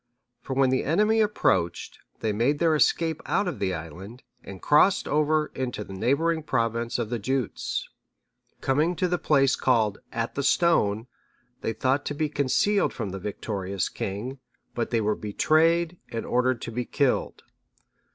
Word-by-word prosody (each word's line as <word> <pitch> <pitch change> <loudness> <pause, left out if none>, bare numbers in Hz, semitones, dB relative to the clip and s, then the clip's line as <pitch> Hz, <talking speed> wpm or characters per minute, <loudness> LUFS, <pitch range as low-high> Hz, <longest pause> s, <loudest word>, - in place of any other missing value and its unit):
For 130 - -5
when 135 -1 +3
the 130 - +1
enemy 210 +8 +3
approached, 95 - 0 0.2
they 110 -2 0
made 120 +8 +1
their 165 0 +3
escape 160 +1 +2
out 205 - +1
of 175 - -4
the 95 -2 0
island, 90 - -9 0.2
and 100 -1 -9
crossed 185 - +4
over 150 0 +1
into 125 -5 -3
the 95 - -10
neighbouring 150 - +1
province 115 -4 -1
of 120 -2 -3
the 120 - -1
Jutes.(638) 130 +2 -5
Coming 150 +6 +1
to 180 - 0
the 180 0 -1
place 135 -3 +3
called 110 -5 +1
At 115 0 -3
the 140 - -2
Stone,(639) 120 - +2 0.6
they 115 - -2
thought 130 +5 0
to 145 - -3
be 155 0 -1
concealed 150 +8 +1
from 105 -5 -4
the 95 - -5
victorious 100 -1 -3
king, 120 +8 -5 0.3
but 120 - -2
they 115 -2 +1
were 105 0 +1
betrayed 165 +10 +2
and 115 - -4
ordered 125 -1 +1
to - - -5
be 120 +1 -3
killed. 140 0 0
130 Hz, 160 wpm, -26 LUFS, 110-155 Hz, 0.6 s, crossed